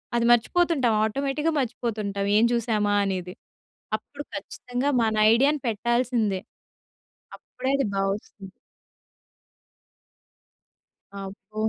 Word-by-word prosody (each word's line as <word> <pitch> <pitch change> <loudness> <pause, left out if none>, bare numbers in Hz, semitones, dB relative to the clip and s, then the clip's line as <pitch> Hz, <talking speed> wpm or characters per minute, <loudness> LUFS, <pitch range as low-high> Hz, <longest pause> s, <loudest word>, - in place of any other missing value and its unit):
అది 235 0 +2
మర్చిపోతుంటాం. 260 -1 +3
ఆటోమేటిక్‌గా 280 +7 -1
మర్చిపోతుంటాం 215 -5 -2
ఏం 225 - +5
చూశామా 215 -3 +1
అనేది. 185 -2 -3 0.6
అప్పుడు 285 +6 -10
ఖచ్చితంగా 250 +3 -3
మన 220 -1 +1 0.2
ఐడియాని 280 +5 +3
పెట్టాల్సిందే. 230 -2 0 1.0
అప్పుడే 260 +1 -5
అది 275 - 0
బా 195 - +1
వస్తుంది. 200 -1 -11 2.7
అబ్బో! 195 +2 -8
230 Hz, 85 wpm, -25 LUFS, 205-260 Hz, 2.7 s, ఏం